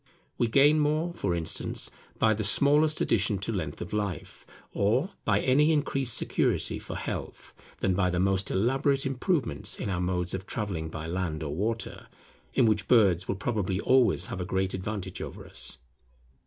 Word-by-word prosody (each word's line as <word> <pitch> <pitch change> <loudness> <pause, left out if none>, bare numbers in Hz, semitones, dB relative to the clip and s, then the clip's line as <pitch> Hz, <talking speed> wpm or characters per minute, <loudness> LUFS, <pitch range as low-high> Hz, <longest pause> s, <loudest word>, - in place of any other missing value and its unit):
We 120 - +3
gain 145 +6 +5
more, 155 +3 0
for 90 - -1
instance, 80 -2 -1 0.3
by 110 -1 +3
the 110 +1 -3
smallest 150 +8 +4
addition 105 -1 +2
to 100 +4 -4
length 80 -9 -4
of 85 - -6
life, 105 -4 -4 0.3
or 125 - +1
by 105 -2 +2
any 150 +5 +4
increased 135 -5 +1
security - - 0
for - - -7
health, - - -6 0.3
than 95 - +2
by 90 0 +1
the 90 0 -1
most 95 +1 +1
elaborate 135 +6 +1
improvements 135 - -1
in 100 - -4
our 90 -1 -1
modes 90 0 -1
of 95 0 -5
travelling 90 -8 -3
by 80 0 -6
land 85 -2 -3
or 75 -2 -4
water, 110 +7 -3 0.5
in - - +4
which 105 -3 +1
birds 95 -7 +4
will 95 - -1
probably 100 -3 -2
always 130 0 +3
have 95 - -4
a - - -1
great 95 +1 -1
advantage 95 -1 -5
over - - -7
us. - - -2
100 Hz, 170 wpm, -28 LUFS, 90-130 Hz, 0.5 s, gain